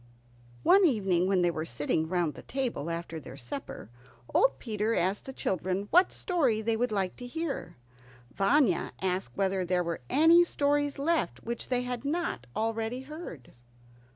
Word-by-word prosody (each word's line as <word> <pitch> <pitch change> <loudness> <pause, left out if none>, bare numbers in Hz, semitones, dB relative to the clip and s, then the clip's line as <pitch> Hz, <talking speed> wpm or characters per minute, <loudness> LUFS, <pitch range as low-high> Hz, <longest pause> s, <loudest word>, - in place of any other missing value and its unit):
One 395 +1 +6
evening, 195 - +2
when 190 -2 +2
they 175 - +3
were 155 -1 -3
sitting 155 +3 -1
round 175 -4 0
the - - -10
table 245 - -3
after 165 -1 -4
their 135 -2 -11
supper, 275 - -7 0.4
old - - +4
Peter 220 -1 -1
asked 190 +3 0
the 265 - -6
children 190 -3 -2
what 360 +2 +5
story 290 - +1
they 225 +1 +1
would 245 +2 0
like 195 -3 -1
to 245 - -7
hear. 320 - -4 0.6
Vanya 200 - +2
asked 190 0 -2
whether 195 -1 +1
there 180 0 +1
were 170 -1 -3
any 330 +4 +6
stories 290 -3 0
left 325 +4 0
which 235 0 -4
they 250 -1 0
had 245 0 -4
not 290 - -2
already 225 +2 -1
heard. 270 - -9
220 Hz, 160 wpm, -29 LUFS, 180-280 Hz, 0.6 s, One